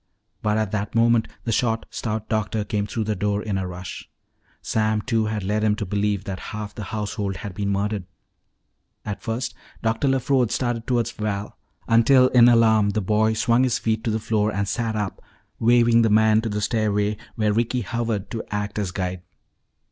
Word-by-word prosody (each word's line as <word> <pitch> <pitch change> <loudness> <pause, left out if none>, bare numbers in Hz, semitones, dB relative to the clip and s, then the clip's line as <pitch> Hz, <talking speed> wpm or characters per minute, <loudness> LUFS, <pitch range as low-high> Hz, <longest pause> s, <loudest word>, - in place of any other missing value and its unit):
But 105 0 +1
at 110 -3 -1
that 105 0 -3
moment 115 0 +4 0.2
the 115 - -2
short, 115 0 0
stout 110 -1 -3
doctor 110 0 -1
came 105 0 -2
through 110 +2 -2
the 105 0 -1
door 100 +2 -1
in 105 -3 -2
a 95 - -3
rush. 90 0 -8 0.5
Sam 110 -1 0
Two 115 -3 +1
had 105 -2 -2
led 105 +3 0
him 105 -1 +3
to 105 - -4
believe 100 0 -1
that 95 -2 -5 0.2
half 105 -1 -6
the 105 - -6
household 105 -1 -3
had 100 +1 -6
been 100 +2 -2
murdered. 100 -1 -1 1.0
At 105 -2 -4
first 115 +1 -3 0.3
Dr. 115 +4 +1
LeFrode 130 -2 +2
started 120 -1 -2
toward 120 -2 +1
Val, 105 -2 -4 0.3
until 125 +3 +5
in 120 -1 +7
alarm 110 -3 +4
the 100 - 0
boy 110 +3 +2
swung 115 +2 +2
his 130 -2 +2
feet 110 0 -1
to - - +1
the 110 - +1
floor 105 -1 0
and 100 -1 -1
sat 115 +2 -1
up, 105 -2 -3 0.4
waving 115 0 +5
the 115 - +3
man 110 +1 +4
to 115 - -3
the 105 0 -2
stairway 105 -1 +1 0.2
where 105 -2 +1
Ricky 120 +3 0
hovered 115 -2 -3
to 115 - -3
act 105 0 -3
as 100 -3 -1
guide. 90 0 -3
110 Hz, 190 wpm, -23 LUFS, 105-115 Hz, 1.0 s, in